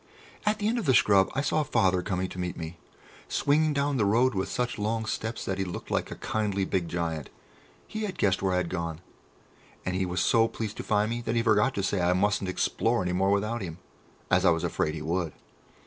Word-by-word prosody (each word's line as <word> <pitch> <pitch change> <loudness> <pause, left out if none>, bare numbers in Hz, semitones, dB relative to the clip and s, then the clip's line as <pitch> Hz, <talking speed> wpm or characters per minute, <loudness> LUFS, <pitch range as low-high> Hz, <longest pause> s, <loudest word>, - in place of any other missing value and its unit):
At 210 0 +3
the 210 - -1
end 235 +2 +1
of 210 - -4
the 130 - +5
scrub 100 -3 +5
I 135 - +1
saw 155 +2 +1
Father 95 -10 +2
coming 95 -1 -2
to 90 - -8
meet 90 0 -3
me, 80 +1 -6 0.5
swinging 155 +2 +2
down 140 -1 0
the 110 - +2
road 120 +5 +3
with 95 -1 -2
such 125 -2 -2
long 110 +2 -1
steps 110 +1 -3
that 95 0 -2
he - - +1
looked 90 -2 -6
like - - 0
a - - -6
kindly 100 -3 -1
big 95 -2 -1
giant. 80 -4 -3 0.6
He 220 - -5
had 205 -3 -3
guessed 95 -2 +2
where 95 -1 +1
I - - +2
had 90 -1 0
gone, 85 -2 -3 0.8
and 95 - -1
he 95 0 0
was 90 0 -2
so 115 +5 +4
pleased 110 -2 -5
to - - -4
find 105 +1 +1
me 120 +1 -2
that 115 0 -2
he 115 - +2
forgot 110 +3 +3
to 100 - -1
say 95 -1 0
I 90 +1 +3
mustn't 100 0 +1
explore 95 - +1
any 90 0 -1
more 95 +2 +2
without 105 +4 0
him, 85 -4 -5 0.5
as 90 0 +4
I 95 - +6
was 80 -1 +1
afraid 75 - -1
he 75 - -5
would. 85 -1 -1
100 Hz, 235 wpm, -28 LUFS, 90-115 Hz, 0.8 s, I